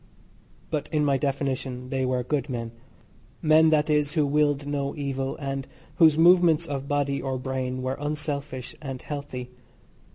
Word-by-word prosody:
But 150 Hz, -2 st, -2 dB
in 150 Hz, -2 st, +2 dB
my 140 Hz, -1 st, +3 dB
definition 130 Hz, -2 st, -2 dB
they 135 Hz, -1 st, 0 dB
were 125 Hz, -1 st, 0 dB
good 140 Hz, +1 st, -1 dB
men 115 Hz, -2 st, -4 dB, 0.7 s
men, 160 Hz, 0 st, +6 dB
that 150 Hz, -1 st, +3 dB
is, 150 Hz, -1 st, +1 dB
who 155 Hz, -3 st, +2 dB
willed 145 Hz, 0 st, +1 dB
no 140 Hz, -1 st, -2 dB
evil, 135 Hz, -2 st, -3 dB
and 135 Hz, -2 st, -4 dB, 0.3 s
whose 160 Hz, -3 st, +6 dB
movements 170 Hz, -1 st, +5 dB
of 140 Hz, -3 st, -4 dB
body 140 Hz, -1 st, 0 dB
or 130 Hz, -1 st, -2 dB
brain 130 Hz, 0 st, -3 dB
were 130 Hz, +1 st, -2 dB
unselfish 145 Hz, -3 st, -3 dB
and 135 Hz, -3 st, -5 dB
healthy. 130 Hz, -4 st, -6 dB
140 Hz, 155 wpm, -26 LUFS, 130-150 Hz, 0.7 s, men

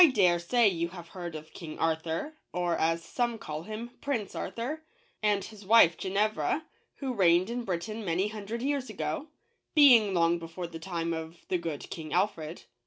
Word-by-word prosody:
DARE 180 Hz, -5 st, +4 dB
say 230 Hz, +7 st, +4 dB
you 170 Hz, -3 st, +1 dB
have 175 Hz, -2 st, -10 dB
heard 175 Hz, -3 st, -6 dB
of 155 Hz, 0 st, -9 dB
King 160 Hz, -3 st, -8 dB
Arthur, 165 Hz, -, -1 dB, 0.2 s
or, 175 Hz, -1 st, 0 dB
as 165 Hz, +1 st, +1 dB
some 240 Hz, -2 st, -1 dB
call 155 Hz, -9 st, -5 dB
him, 220 Hz, +6 st, -6 dB
Prince 235 Hz, -9 st, -2 dB
Arthur, 270 Hz, +7 st, -4 dB, 0.4 s
and 205 Hz, -2 st, +2 dB
his 210 Hz, 0 st, -10 dB
wife 195 Hz, -5 st, +7 dB
Genevra, 210 Hz, +10 st, 0 dB, 0.3 s
who 265 Hz, -3 st, -3 dB
reigned 185 Hz, -1 st, +4 dB
in 245 Hz, 0 st, -2 dB
Britain 215 Hz, +5 st, -3 dB
many 185 Hz, +2 st, +1 dB
hundred 215 Hz, +2 st, -5 dB
years 280 Hz, -2 st, -1 dB
ago 305 Hz, 0 st, -3 dB, 0.2 s
— -, -, -48 dB
being 240 Hz, -10 st, +7 dB
long 170 Hz, 0 st, +3 dB
before 165 Hz, +2 st, -6 dB
the 165 Hz, -1 st, -7 dB
time 170 Hz, -1 st, -2 dB
of 160 Hz, +1 st, -7 dB
the 180 Hz, -, +1 dB
good 165 Hz, -4 st, -4 dB
King 155 Hz, -2 st, -6 dB
Alfred. 175 Hz, -4 st, -1 dB
185 Hz, 175 wpm, -29 LUFS, 170-225 Hz, 0.4 s, wife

